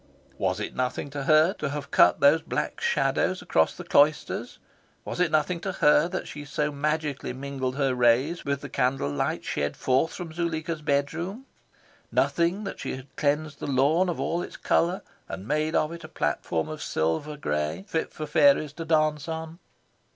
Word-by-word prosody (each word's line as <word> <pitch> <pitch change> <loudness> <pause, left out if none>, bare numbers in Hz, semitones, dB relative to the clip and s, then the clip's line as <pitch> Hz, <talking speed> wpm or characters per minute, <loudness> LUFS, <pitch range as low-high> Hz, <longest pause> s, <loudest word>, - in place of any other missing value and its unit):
Was 95 +1 0
it 105 - -4
nothing 130 +2 -2
to 140 -1 -4
her 155 +5 +5
to 150 - -1
have 140 0 -5
cut - - +5
those 145 +3 +6
black - - -3
shadows - - +1
across 80 0 +2
the - - -8
cloisters? 150 +1 +2 0.5
Was - - -5
it 180 -2 +3
nothing 155 +3 +1
to 190 +2 -4
her 150 -2 +4
that 185 +1 -4
she 145 - -7
so 150 +1 -1
magically 150 -2 -2
mingled 130 -1 -4
her 135 -2 +1
rays 125 +7 +2
with 140 -1 -2
the - - -6
candle 125 - 0
light 70 - -1
shed 75 0 -2
forth 130 +5 +1
from 170 -3 -7
Zuleika's 165 -1 -2
bedroom? 160 - -1 0.7
Nothing, 175 +5 +1
that 195 - -6
she - - -3
had 130 +1 -12
cleansed 150 +1 0
the - - -5
lawn 145 +7 +3
of 175 - -3
all 170 +1 -1
its - - -7
colour, 175 +3 +1 0.3
and 95 +3 -6
made 155 +2 0
of 155 - +2
it 170 -1 -8
a - - -7
platform 80 - -1
of 155 -1 -6
silver 80 - -1
grey, 75 - -2
fit 160 - -2
for 155 - -5
fairies 155 - +4
to 165 +1 -6
dance 155 -2 +1
on? 160 +1 -5
150 Hz, 180 wpm, -26 LUFS, 135-160 Hz, 0.7 s, those